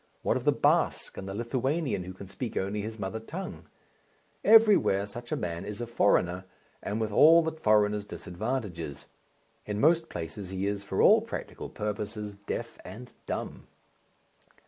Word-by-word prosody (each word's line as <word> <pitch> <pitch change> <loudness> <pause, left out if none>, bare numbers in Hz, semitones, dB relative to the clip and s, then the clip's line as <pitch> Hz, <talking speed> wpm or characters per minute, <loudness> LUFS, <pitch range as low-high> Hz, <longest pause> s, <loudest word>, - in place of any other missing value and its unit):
What - - +2
of - - -3
the - - +6
Basque - - +1
and 95 - -6
the 95 - -5
Lithuanian 130 - -1
who 95 - -7
can 95 +2 -10
speak 110 +5 -5
only 100 +2 -1
his 110 +2 -6
mother 105 +2 -4
tongue? 170 +12 -7 0.8
Everywhere 210 - +6
such 120 +4 -9
a - - +2
man 85 0 -4
is 105 0 -6
a 120 - -2
foreigner 95 -5 +2 0.4
and 105 +2 -3
with 110 -1 -1
all 165 +9 +7
the 160 - -1
foreigner's 105 -7 +2
disadvantages. 90 - -4 0.6
In 105 0 -2
most 165 +4 +3
places 90 +3 -6
he 95 0 -3
is 100 0 -2
for 95 -1 0
all - - +7
practical - - -6
purposes 105 0 -4
deaf 100 0 -6
and 120 +7 -10
dumb. - - -5
105 Hz, 160 wpm, -29 LUFS, 95-120 Hz, 0.8 s, all